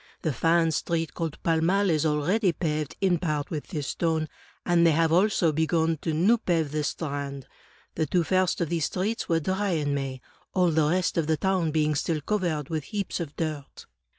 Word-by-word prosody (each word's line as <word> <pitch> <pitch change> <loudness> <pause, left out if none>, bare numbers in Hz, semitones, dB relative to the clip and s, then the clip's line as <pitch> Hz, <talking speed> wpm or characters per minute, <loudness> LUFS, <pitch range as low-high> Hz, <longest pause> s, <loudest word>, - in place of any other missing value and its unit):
The 155 - 0
fine 165 +5 +2
street 165 +1 -1
called 165 -3 -4
Pall 165 -1 +2
Mall 195 +3 +2
is 155 0 +2
already 175 +6 +1
paved 155 -4 -2
in 180 -3 +2
part 150 -4 -2
with 150 -3 -4
this 150 -7 -4
stone; 160 -2 -1 0.4
and 175 -1 +3
they 165 -2 +5
have 165 +1 +2
also 180 -2 +3
begun 160 +1 +1
to 160 - -3
new 190 +10 +3
pave 165 -8 0
the 150 0 -1
Strand. 140 -3 -4 0.5
The 155 - -1
two 175 +4 +2
first 185 +2 +1
of 165 - 0
these 165 -4 0
streets 210 +5 -2
were 165 -1 +3
dry 190 +3 -1
in 145 -3 0
May, 135 -2 -3 0.4
all 180 -2 +3
the 155 -1 +2
rest 175 0 +1
of 155 - -1
the 160 -1 +2
town 190 -3 +1
being 155 0 +1
still 155 +1 -1
covered 170 -6 -1
with 155 -3 -3
heaps 200 -3 -3
of 155 -4 -5
dirt." 155 -4 -5
165 Hz, 200 wpm, -26 LUFS, 150-175 Hz, 0.5 s, they